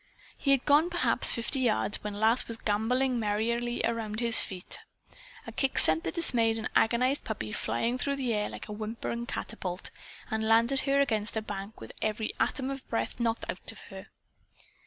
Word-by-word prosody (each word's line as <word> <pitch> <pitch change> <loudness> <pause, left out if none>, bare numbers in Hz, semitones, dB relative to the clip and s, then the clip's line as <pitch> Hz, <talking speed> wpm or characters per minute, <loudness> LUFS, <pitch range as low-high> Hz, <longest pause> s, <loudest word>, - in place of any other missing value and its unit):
He 275 - -2
had 275 -2 +3
gone 300 +4 +4
perhaps 350 0 +5
fifty 235 +4 -1
yards 225 -4 0
when 210 -1 -4
Lass 220 +4 +2
was 230 - -3
gamboling 240 +5 0
merrily 235 +3 -1
around 220 -2 -2
his 235 -2 +6
feet. 185 -2 -1 0.7
A - - -7
kick 270 -1 -1
sent 160 +1 +5
the - - -2
dismayed 230 -9 +1
and 220 - -3
agonized 250 +5 +2
puppy 155 - -5
flying 230 - -1
through 280 +2 0
the 255 -4 -1
air 210 -1 -1
like - - -9
a - - -8
whimpering 230 +2 -4
catapult, 185 -7 -4 0.4
and 220 0 -1
landed 230 +4 +3
her 275 0 +1
against 220 -5 0
a - - 0
bank 205 0 -7
with 110 - -10
every 215 0 -2
atom 265 0 0
of 270 -1 -8
breath 115 - -2
knocked 230 -1 -1
out - - -5
of - - -14
her. - - -9
230 Hz, 180 wpm, -29 LUFS, 210-255 Hz, 0.7 s, his